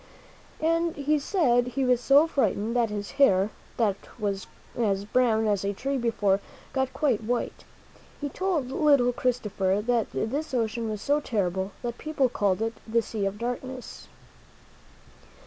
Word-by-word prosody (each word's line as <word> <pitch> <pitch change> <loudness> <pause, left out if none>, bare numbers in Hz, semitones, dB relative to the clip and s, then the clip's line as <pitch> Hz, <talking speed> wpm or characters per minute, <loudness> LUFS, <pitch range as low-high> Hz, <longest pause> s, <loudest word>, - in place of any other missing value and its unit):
And 330 +1 +1
he 290 +1 +1
said 255 -8 +2
he 260 +2 -1
was 250 -1 +3
so 280 +4 +6
frightened 230 - 0
that 235 -2 +2
his 205 -1 -4
hair, 195 -5 +5 0.3
that 210 -4 +2 0.2
was 200 -3 -2 0.3
as 200 -4 0
brown 225 -1 +2
as 205 -3 +1
a 200 0 -1
tree 270 +6 -2
before, 210 -5 +1 0.3
got 265 -1 0
quite 260 -8 +1
white. 240 +2 -2 0.5
He 290 - -2
told 315 -5 -1
little 275 -4 +4
Christopher 210 -6 0
that 240 -2 +2
this 275 +5 -2
ocean 225 -1 -1
was 215 -1 -4
so 290 +1 +2
terrible 190 -7 -1
that 240 0 -4
people 300 -4 +1
called 205 -2 +1
it 225 0 -1
"The 230 +1 +2
Sea 210 -3 -2
of 195 +1 -4
Darkness." 245 +2 -5
240 Hz, 150 wpm, -27 LUFS, 210-270 Hz, 0.5 s, so